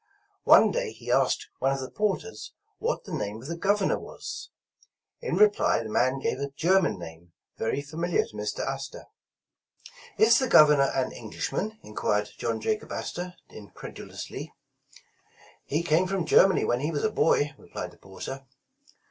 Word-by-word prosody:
One - - +7
day - - -2
he - - -6
asked - - +2
one 135 +1 +2
of 135 - -3
the 130 - -6
porters 215 - -2 0.3
what 475 +3 -1
the 185 - -9
name 105 -7 -3
of 125 - -10
the 170 - -3
Governor 200 +3 +1
was. - - -8 0.7
In 480 - -2
reply 210 - +4
the 110 - -6
man 130 +4 +2
gave 135 - -2
a 140 0 -2
German 175 - +2
name 85 0 -11 0.3
very 125 +5 -1
familiar 165 +4 0
to - - -17
Mr. 105 0 -3
Astor. 135 0 -5 1.1
"Is 230 +2 +6
the 260 - 0
Governor 150 - +6
an 130 -1 0
Englishman?" 195 - -4
enquired 105 0 -1
John 115 -1 -1
Jacob 215 - -2
Astor, 180 +1 -5
incredulously. 105 -2 -9 1.1
"He 155 +4 -1
came 170 +3 +3
from 190 -3 -1
Germany 190 +4 +5
when 120 - +1
he 145 +4 -1
was 150 -3 -2
a 220 - +2
boy," 145 -5 +2
re - - -17
plied - - -5
the - - -19
porter. 135 +8 -8
150 Hz, 160 wpm, -27 LUFS, 120-195 Hz, 1.1 s, One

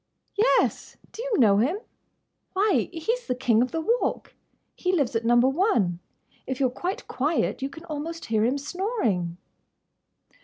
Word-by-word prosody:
"Yes!—Do 445 0 0
you - - 0
know 210 -6 +5
him?" 275 - +2 0.8
"Why, 405 +2 +2
he's 450 +9 -2
the 250 - 0
King 235 -3 +3
of 255 - +1
the 325 - -2
Walk! 465 +9 -1 0.4
He 365 - 0
lives 280 -9 +1
at 225 - +1
Number 240 +2 +5
One. 265 - +1 0.5
If 260 -1 -3
you 270 - +3
're 250 - +1
quite 360 +9 -4
quiet 295 +1 0
you 270 - -2
can 320 +4 -12
almost 325 +2 -5
hear 220 -1 +1
him 250 +5 +2
snoring!" 275 - -1
280 Hz, 155 wpm, -26 LUFS, 240-370 Hz, 0.8 s, know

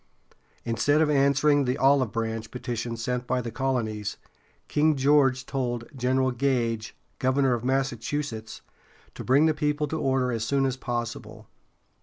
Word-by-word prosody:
Instead 145 +6 +2
of 155 -1 +3
answering 140 0 +3
the 125 +2 0
"olive 135 -4 +3
branch" 115 -1 -3
petition 120 -2 -4
sent 125 +2 -3
by 130 - +1
the 120 -2 -4
colonies, 115 -5 -2 0.5
King 155 +1 +2
George 135 -2 +3
told 120 -4 -3
General 130 +1 +1
Gage, 120 -3 -1 0.2
governor 130 0 +2
of 120 -1 -3
Massachusetts, 130 -2 -2 0.5
to - - -8
bring 140 +4 +4
the 160 - +3
people 150 0 -1
to 160 - -2
order 130 -2 +1
as 115 -2 -2
soon 135 +3 +1
as 130 -1 0
possible. 120 -3 -5
130 Hz, 145 wpm, -26 LUFS, 120-140 Hz, 0.5 s, bring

